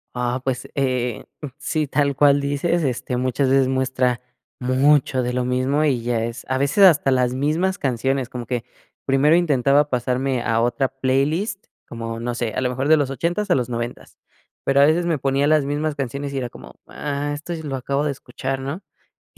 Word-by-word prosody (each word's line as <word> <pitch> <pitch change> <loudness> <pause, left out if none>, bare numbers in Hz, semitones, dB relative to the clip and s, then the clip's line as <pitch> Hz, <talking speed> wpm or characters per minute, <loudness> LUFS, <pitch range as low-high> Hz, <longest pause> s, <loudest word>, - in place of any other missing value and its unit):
Ah, 125 +1 -1
pues, 130 -1 -2
eh, 125 -5 -1 0.3
sí, 155 -2 -1
tal 140 0 0
cual 145 -1 +5
dices, 145 +4 0
este, 125 -1 -2
muchas 130 +2 0
veces 135 -1 +3
muestra 130 -2 0 0.4
mucho 130 0 +3
de 125 - -1
lo 125 0 -1
mismo, 130 +4 +1
y 130 -5 +1
ya 115 -1 0
es 115 0 -7
a 130 - +1
veces 140 +9 +3
hasta 150 -7 +6
las 125 -1 +2
mismas 160 +8 0
canciones. 135 0 -1
Como 120 -1 -7
que 120 0 -3 0.4
primero 140 +4 +4
intentaba 145 -3 +3
pasarme 125 0 0
a 115 -1 +1
otra 120 +2 +1
playlist, 140 - -1 0.2
como, 115 -1 -5
no 120 0 -3
sé, 115 -2 -2
a - - 0
lo 125 - +1
mejor 130 +3 -2
de 160 - +7
los 140 -2 0
ochentas 175 +8 -2
a - - +5
los 125 -1 -1
noventas, 120 0 -5 0.5
pero, 140 0 +4
a - - +8
veces 170 +3 +2
me 165 -3 +1
ponía 135 +2 +1
las 155 -1 +4
mismas 145 +2 -2
canciones, 140 +1 -4
y - - -3
era 125 -2 -4
como, - - -13
ah, 145 0 -3
esto 150 +4 -5
sí 160 - -7
lo 140 -3 -3
acabo 140 +2 -1
de 150 - 0
escuchar, 135 +1 -5
¿no? 140 +9 -5 0.5
Y, - - -24
135 Hz, 200 wpm, -22 LUFS, 125-145 Hz, 0.5 s, a